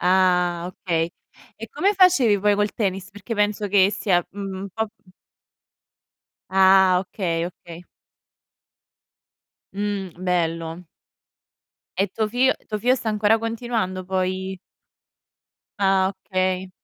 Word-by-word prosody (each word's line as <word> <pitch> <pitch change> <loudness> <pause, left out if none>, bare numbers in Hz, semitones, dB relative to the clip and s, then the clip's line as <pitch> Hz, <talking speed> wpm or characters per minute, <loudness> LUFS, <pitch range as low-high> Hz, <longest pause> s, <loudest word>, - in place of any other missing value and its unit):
Ah 180 -1 +2
okay. 170 -2 -2 0.5
E - - -6
come 405 -3 +1
facevi 360 - +5
poi 205 +1 +3
col 205 0 0
tennis? 195 -3 -2
Perché 205 +3 -6
penso 210 0 0
che 195 0 +4
sia 180 -5 0
un 195 0 -6
po', 220 +2 -1 0.2
mhmm 185 - -22 1.4
Ah 190 -1 +5
okay, 175 -3 -2
okay. 175 -1 -11 1.9
Mh. 200 -2 -3
Bello. 170 -1 -2 1.1
E 195 +1 +2
tuo 220 -1 -1
figlio 250 +4 +3
tuo 210 - -3
figlio 245 +5 +3
sta 240 -3 -4
ancora 215 +1 +2
continuando 225 -5 -3
poi 190 0 -2 1.2
Ah, 195 -1 +3 0.2
okay. 185 0 0
190 Hz, 110 wpm, -23 LUFS, 185-210 Hz, 1.9 s, facevi